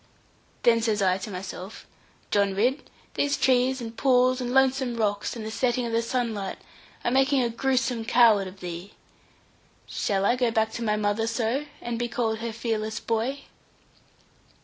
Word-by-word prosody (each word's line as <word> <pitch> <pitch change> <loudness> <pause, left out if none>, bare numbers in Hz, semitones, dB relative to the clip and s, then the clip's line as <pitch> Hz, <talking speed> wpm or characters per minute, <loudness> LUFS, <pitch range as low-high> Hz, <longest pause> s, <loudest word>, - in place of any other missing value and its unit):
Then 230 -1 +5
says 220 -2 +1
I 190 -1 +2
to 200 - -6
myself 190 +1 -7 0.5
'John 200 -1 +2
Ridd, 250 +8 0 0.2
these 285 0 0
trees, 260 0 +2
and 230 -1 -7
pools, 255 -1 +3
and 245 -1 -2
lonesome 265 -1 +2
rocks, 205 -1 -1
and 220 -2 -6
setting 245 +2 0
of 235 - -3
the 230 0 +2
sunlight 230 -5 -2 0.5
are 240 - +1
making 270 0 +3
a 235 - -1
gruesome 250 -1 0
coward 225 -4 +5
of 190 +1 -12
thee. 175 +2 -7 0.9
Shall 195 -1 -1
I 240 - +4
go 250 -2 +1
back 220 -1 +1
to 235 - -5
my 210 -2 +1
mother 210 +1 0
so, 235 +5 -1
and 235 -1 -3
be 240 - 0
called 225 -2 -1
her 230 0 -3
fearless 220 -1 -2
boy?' 235 +5 -2
230 Hz, 165 wpm, -26 LUFS, 215-250 Hz, 0.9 s, Then